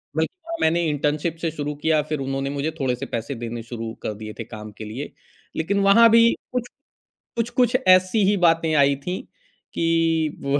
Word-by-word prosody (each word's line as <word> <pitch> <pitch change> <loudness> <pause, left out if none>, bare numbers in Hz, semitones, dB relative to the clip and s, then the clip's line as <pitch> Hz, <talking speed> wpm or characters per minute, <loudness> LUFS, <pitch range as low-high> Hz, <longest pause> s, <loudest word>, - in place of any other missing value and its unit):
बल्कि - - 0
ना 335 - -3
मैंने 165 +2 +3
इंटर्नशिप 150 +3 -1
से 165 - 0
शुरू 150 -1 -4
किया, 155 +1 +1
फ़िर 155 0 -4
उन्होंने 135 0 -2
मुझे 145 +2 -2
थोड़े-से 125 -3 -1
पैसे 115 +4 -4
देने 115 0 -6
शुरू 115 -1 -6
कर 110 - -2
दिए 110 +1 -8
थे - - -2
काम 110 -1 -9
के 110 - -7
लिए। 120 +7 -6 0.4
लेक़िन 200 +5 0
वहाँ 230 +4 +7
भी 230 +1 +6 0.2
कुछ 250 -1 -1 0.7
कुछ, 235 0 -1
कुछ 245 0 +2
ऐसी 185 +3 +5
ही 205 - +3
बातें 165 -1 +3
आई 140 -1 +4
थीं 180 +7 -5 0.5
कि 165 -2 +1
वो 140 +1 +1
150 Hz, 185 wpm, -23 LUFS, 135-180 Hz, 0.7 s, वहाँ